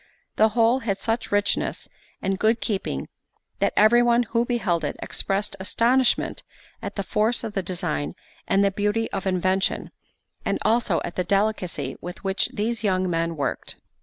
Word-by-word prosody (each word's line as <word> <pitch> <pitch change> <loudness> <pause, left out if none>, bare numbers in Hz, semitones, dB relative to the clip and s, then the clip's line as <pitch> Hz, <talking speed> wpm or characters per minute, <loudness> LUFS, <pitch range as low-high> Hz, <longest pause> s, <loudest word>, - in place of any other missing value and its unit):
The 220 +1 +5
whole 230 +3 +4
had 205 -6 -1
such 225 +3 -2
richness 205 0 0 0.4
and 195 0 0
good 225 +2 +3
keeping, 190 - -2 0.5
that - - +2
every 225 +3 +6
one 240 0 +4
who 230 +1 +1
beheld 205 -9 0
it 145 - -2
expressed 195 +1 -2
astonishment 240 +6 +2 0.4
at - - -5
the 200 - -2
force 215 +5 +1
of 220 -2 -4
the 195 - 0
design 85 - -3 0.3
and 195 0 +3
beauty 210 +2 0
of 195 - -3
invention, 185 +1 0 0.5
and - - 0
also 220 -6 +2
at 170 - -7
the 180 - +2
delicacy 190 -8 0
with 180 +2 -8
which 195 0 0
these 225 +2 -2
young 185 -3 +1
men 165 0 0
worked. 135 -3 -2
200 Hz, 160 wpm, -24 LUFS, 185-225 Hz, 0.5 s, every